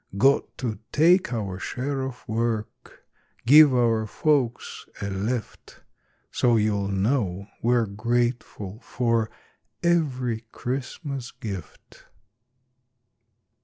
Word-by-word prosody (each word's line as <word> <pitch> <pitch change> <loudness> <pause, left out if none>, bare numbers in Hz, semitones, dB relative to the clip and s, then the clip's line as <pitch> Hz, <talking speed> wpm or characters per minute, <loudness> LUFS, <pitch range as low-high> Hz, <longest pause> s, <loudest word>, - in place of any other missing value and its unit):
Got 135 +6 +3
to 110 -5 -3
take 175 +3 +4
our 100 -6 -3
share 135 +5 -3
of 130 -1 -6
work, 110 -1 -3 0.4
Give 145 +1 +8
our 115 -3 +2
folks 130 -1 0
a 100 0 -3
lift. 105 +4 -4 0.5
So 120 -1 +3
you'll 105 -2 +1
know 100 -1 0 0.2
we're 120 0 +3
grateful 115 -1 -2
for 115 -3 0 0.5
Every 130 -9 +1
Christmas 135 0 -4
gift. 100 -6 -9
120 Hz, 90 wpm, -25 LUFS, 105-130 Hz, 0.5 s, Give